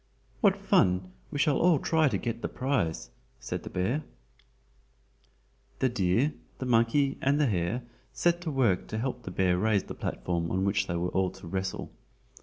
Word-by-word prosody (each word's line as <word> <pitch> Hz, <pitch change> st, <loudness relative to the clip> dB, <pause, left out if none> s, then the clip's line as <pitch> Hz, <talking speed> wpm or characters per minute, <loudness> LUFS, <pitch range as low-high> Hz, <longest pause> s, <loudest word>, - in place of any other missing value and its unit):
"What 200 Hz, -4 st, +4 dB
fun! 95 Hz, -, +2 dB, 0.2 s
we -, -, -4 dB
shall 145 Hz, 0 st, +3 dB
all 175 Hz, -2 st, +5 dB
try 160 Hz, +2 st, +2 dB
to 110 Hz, -7 st, +1 dB
get 115 Hz, +3 st, -4 dB
the -, -, -1 dB
prize," 100 Hz, -, -1 dB, 0.3 s
said -, -, -4 dB
the -, -, -8 dB
bear. 115 Hz, +12 st, 0 dB, 1.8 s
The 130 Hz, -, +2 dB
deer, 115 Hz, +6 st, +1 dB, 0.2 s
the 130 Hz, -, -4 dB
monkey 125 Hz, +4 st, +2 dB
and 140 Hz, +2 st, +2 dB
the 150 Hz, -, +4 dB
hare 105 Hz, +2 st, 0 dB, 0.3 s
set 175 Hz, 0 st, +1 dB
to 175 Hz, -, -3 dB
work 120 Hz, -10 st, +2 dB
to 110 Hz, -, -4 dB
help 125 Hz, +1 st, -2 dB
the 115 Hz, -, -7 dB
bear 90 Hz, -1 st, +1 dB
raise 105 Hz, -1 st, +2 dB
the -, -, -7 dB
platform 85 Hz, -1 st, -2 dB
on 95 Hz, +1 st, 0 dB
which 100 Hz, -1 st, +1 dB
they 85 Hz, -, -2 dB
were 85 Hz, +1 st, -1 dB
all 95 Hz, 0 st, +1 dB
to 95 Hz, +1 st, -13 dB
wrestle. 95 Hz, +2 st, -3 dB
115 Hz, 180 wpm, -29 LUFS, 95-140 Hz, 1.8 s, all